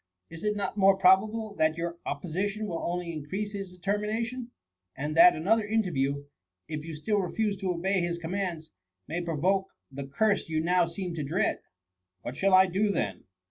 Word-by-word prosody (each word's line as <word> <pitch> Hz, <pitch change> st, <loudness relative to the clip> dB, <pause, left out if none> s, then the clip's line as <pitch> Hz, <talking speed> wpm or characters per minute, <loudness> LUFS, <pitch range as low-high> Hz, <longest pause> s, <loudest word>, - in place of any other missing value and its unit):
Is 165 Hz, +3 st, -9 dB
it 210 Hz, 0 st, +1 dB
not 200 Hz, 0 st, -3 dB
more 195 Hz, -1 st, +5 dB
probable 210 Hz, +4 st, +3 dB
that 155 Hz, 0 st, +2 dB
your 170 Hz, 0 st, -4 dB
opposition 190 Hz, +8 st, -2 dB
will 170 Hz, -5 st, -3 dB
only 175 Hz, -1 st, -3 dB
increase 190 Hz, +8 st, -4 dB
his 195 Hz, -3 st, -6 dB
determination; 215 Hz, +6 st, -2 dB, 0.5 s
and 150 Hz, +3 st, -3 dB
that 235 Hz, +4 st, +8 dB
another 205 Hz, +8 st, +2 dB
interview^ 140 Hz, -10 st, 0 dB, 0.4 s
if 155 Hz, -1 st, -4 dB
you 160 Hz, -1 st, -6 dB
still 205 Hz, +7 st, 0 dB
refuse 205 Hz, +2 st, 0 dB
to 190 Hz, -1 st, -3 dB
obey 185 Hz, +2 st, +1 dB
his 170 Hz, 0 st, -1 dB
commands, 170 Hz, -2 st, -4 dB, 0.4 s
may 170 Hz, +3 st, -2 dB
provoke 180 Hz, +4 st, 0 dB, 0.2 s
the 135 Hz, 0 st, -6 dB
curse 200 Hz, +7 st, +1 dB
you 160 Hz, -1 st, 0 dB
now 175 Hz, +1 st, +3 dB
seem 175 Hz, +1 st, -4 dB
to 160 Hz, -3 st, -3 dB
dread? 160 Hz, +7 st, 0 dB, 0.6 s
What 125 Hz, -, -5 dB
shall 195 Hz, +3 st, +4 dB
I 185 Hz, 0 st, +8 dB
do 195 Hz, +3 st, +1 dB
then 105 Hz, -, -2 dB
180 Hz, 175 wpm, -28 LUFS, 160-205 Hz, 0.6 s, that